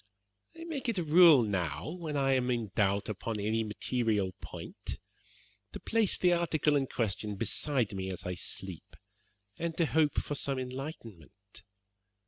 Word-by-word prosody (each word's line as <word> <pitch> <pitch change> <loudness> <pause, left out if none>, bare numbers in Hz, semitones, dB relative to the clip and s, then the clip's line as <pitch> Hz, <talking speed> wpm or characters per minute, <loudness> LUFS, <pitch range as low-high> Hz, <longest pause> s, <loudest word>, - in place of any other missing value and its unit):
"I - - -7
make 300 -7 -3
it 225 - -1
a 175 - 0
rule 160 -4 +7
now 90 - -2
when 160 -4 -4
I 135 -1 +3
am 130 -1 +1
in 115 -5 -1
doubt 100 -2 +1
upon 110 +1 -3
any 110 +2 0
material 105 -2 -1
point - - -8 0.8
to - - -6
place 225 -3 +1
the 180 -1 +4
article 160 -3 +2
in 135 -2 +1
question 105 -3 -2
beside 115 +2 0
me 95 -1 -3
as 95 - -6
I 90 - -3
sleep, 90 -1 -6 0.6
and 165 -1 -3
to 170 - +3
hope 155 -1 +2
for - - -1
some 140 -1 -1
enlightenment. 115 - -8
125 Hz, 155 wpm, -31 LUFS, 100-155 Hz, 0.8 s, rule